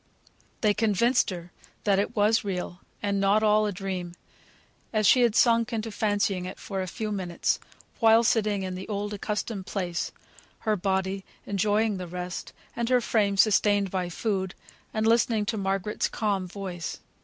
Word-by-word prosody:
They 210 -2 +4
convinced 230 +4 +2
her 175 -2 -7 0.3
that 200 -2 +3
it 205 +3 -1
was 215 +2 +3
real, 180 -3 -4 0.2
and 200 -1 +1
not 200 +2 +3
all 215 0 +4
a - - -1
dream, 185 -2 -4 0.8
as 215 -2 +1
she 250 +6 +6
had 235 -3 +3
sunk 230 0 +4
into 225 -1 -3
fancying 205 -3 0
it 185 - -6
for 195 -2 -4
a 185 - -3
few 215 +4 -4
minutes, 185 -4 -1 0.4
while 225 0 +6
sitting 210 -3 +2
in 185 -1 -3
the 185 +1 -6
old 205 0 -3
accustomed 205 -1 -3
place, 175 -4 -2 0.5
her 215 -1 +1
body 190 0 -1 0.2
enjoying 205 +1 +1
the 180 -1 -5
rest, 180 +1 -5 0.2
and 235 0 -1
her 250 -1 +5
frame 205 -4 +1
sustained 205 -1 +4
by 185 -2 -1
food, 190 0 -2 0.4
and 220 0 -1
listening 225 -1 +3
to 220 - -1
Margaret's 195 +1 -1
calm 200 -4 -1
voice. 180 -3 -5
205 Hz, 165 wpm, -27 LUFS, 190-215 Hz, 0.8 s, she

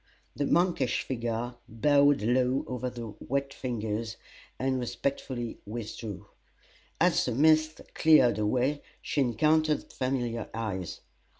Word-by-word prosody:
The 145 - -1
monkish 175 -8 +2
figure 120 -1 -3 0.2
bowed 140 +2 +4
low 125 +3 +2
over 125 0 -3
the 115 -3 -7
wet 140 +1 -2
fingers, 115 -2 -3 0.4
and 130 0 0
respectfully 120 -1 -3
withdrew. 105 -2 -6 0.7
As - - +3
the - - -1
mist 155 +2 +3
cleared 130 -8 +5
away 125 +7 +1 0.2
she 145 - 0
encountered 150 +5 +2
familiar 120 -4 -2
eyes. 100 -6 -4
125 Hz, 110 wpm, -29 LUFS, 115-140 Hz, 0.7 s, cleared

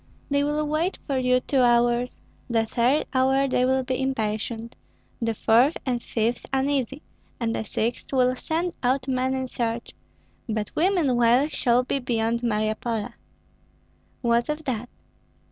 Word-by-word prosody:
They 285 0 +3
will 295 +1 0
wait 315 +5 0
for 275 -3 0
you 250 0 +3
two 270 0 +1
hours; 240 0 +2 0.3
the 225 -1 +2
third 245 +6 +2
hour 265 +1 +3
they 250 -1 +2
will 260 0 +2
be 255 +1 -2
impatient, 225 -2 -2 0.5
the 230 -1 0
fourth 240 +9 +4
and 245 -3 -1
fifth 230 +1 -1
uneasy, 270 +1 0 0.4
and 230 -2 -1
the - - -2
sixth 230 +2 -3
will 255 -1 +3
send 335 +6 -2
out 255 +1 +1
men 260 0 0
in 260 0 -2
search; 235 -2 -3 0.6
but 215 -2 -2
we 350 +4 +3
meanwhile 260 -7 +3
shall 245 -4 +2
be 270 +2 -1
beyond 235 -2 0
Maryapole." 220 0 -1 1.1
"What 235 +1 +2
of 300 +1 -2
that?" 245 -4 -3
250 Hz, 145 wpm, -25 LUFS, 235-270 Hz, 1.1 s, fourth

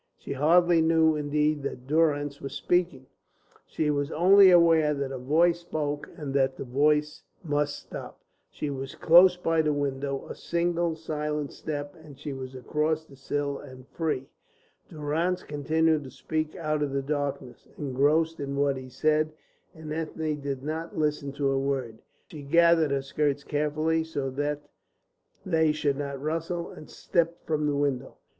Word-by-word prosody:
She - - -6
hardly 170 +4 +4
knew 160 -1 +4
indeed 150 0 0
that 135 -2 -5
Durrance 145 -1 +1
was 135 - -6
speaking, 175 -7 0 0.6
she 150 -1 0
was 145 0 -1
only 190 +4 +7
aware 165 -4 +5
that 140 -1 -3
a 135 - -4
voice 165 +6 +3
spoke, 150 -4 -3
and 140 -3 -5
that 135 -1 +1
the - - -4
voice 150 +4 +1 0.2
must 145 -2 -1
stop. - - -9 0.3
She 145 - -4
was 135 0 -6
close 180 +2 +6
by 165 -2 +1
the 155 -1 +1
window; 140 -1 -2
a - - -6
single 170 -1 -1
silent 150 -2 -3
step, 145 -2 -5
and 155 -4 -14
she 145 0 -6
was 130 -1 -7
across 155 +4 -1
the 140 - -16
sill 140 +1 -3
and 130 -2 -12
free. 155 -5 -2 0.6
Durrance 160 +4 -1
continued 155 +1 +1
to - - -8
speak 155 +3 -3
out 155 -2 -1
of 145 -2 -1
the 140 0 -1
darkness, 140 -3 -4
engrossed 150 +4 +1
in 140 -1 -3
what 140 -1 +1
he 130 0 -8
said, 155 +3 +1 0.4
and 155 -1 -7
Ethne 155 -1 -3
did 135 -2 -4
not 160 +3 -4
listen 150 -2 0
to 140 -1 0
a 135 - +1
word. 130 -5 -2 0.3
She 155 - -8
gathered 165 +1 +4
her 140 -1 0
skirts 145 0 -1
carefully, 155 +2 0
so 140 -4 -3
that 145 +2 -2 0.8
they 160 -4 +3
should 145 -2 0
not 140 -1 -4
rustle, 165 +3 -3
and 155 - -12
stepped 170 -1 -1
from 150 -1 0
the 145 - 0
window. 140 -2 -1
150 Hz, 165 wpm, -27 LUFS, 140-160 Hz, 0.8 s, only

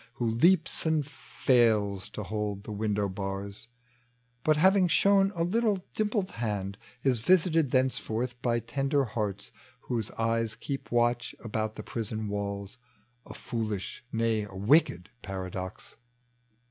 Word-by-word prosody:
Who 120 - -2
leaps 160 +10 +3
and 155 -2 +2
fails 110 -8 +1
to 105 - -6
hold 105 0 -3
the 110 - -7
window 105 -1 0
baa's, 100 +3 -5 0.8
But 155 -1 +3
having 190 +3 +5
shown 195 +4 +4
a 165 - 0
little 205 0 +1
dimpled 210 -3 0
band 100 -3 -2 0.2
Is 130 -4 +3
visited 165 +1 +3
thenceforth 125 -1 0
by 120 -1 +1
tender 140 +4 0
hearts 105 -3 -3 0.3
Whose 115 -4 -2
eyes 115 -1 0
keep 135 +4 -5
watch 120 0 +1
about 110 -1 -3
the - - -7
prison 110 -2 -4
walls. 100 +2 -4 0.5
A - - -9
foolish, 110 -2 -4
nay, 115 -1 +1
a 100 -2 -12
wicked 100 - +3
paradox 95 -1 -6
115 Hz, 130 wpm, -29 LUFS, 105-145 Hz, 0.8 s, having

